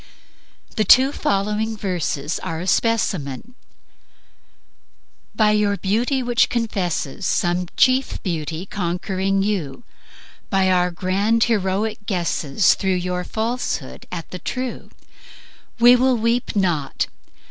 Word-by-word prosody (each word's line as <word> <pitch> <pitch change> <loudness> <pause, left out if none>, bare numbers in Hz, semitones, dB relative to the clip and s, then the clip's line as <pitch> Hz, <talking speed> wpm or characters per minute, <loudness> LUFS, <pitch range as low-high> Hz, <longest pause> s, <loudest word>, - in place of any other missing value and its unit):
The 215 - +3
two 260 +7 +6
following 210 -1 -1
verses 175 -6 -2
are 160 0 -4
a 175 - -5
specimen: 195 - 0 1.8
"By 215 -1 +4
your 210 -1 +2
beauty 240 +8 0
which 240 -1 +2
confesses 195 - -2
Some 175 0 0
chief 255 +1 +3
Beauty 165 -1 -3
conquering 190 +1 -1
you, 195 - -3 0.7
By 190 -2 +2
our 180 -1 +3
grand 195 +6 +1
heroic 205 -1 -1
guesses 175 -2 +2
Through 190 -2 0
your 180 0 -2
falsehood 220 - -3
at 170 -2 -6
the 180 - -6
True, 255 +4 -5 0.9
We 240 +1 +7
will 255 0 +3
weep 230 +1 0
NOT! 170 -8 0
195 Hz, 110 wpm, -21 LUFS, 180-225 Hz, 1.8 s, We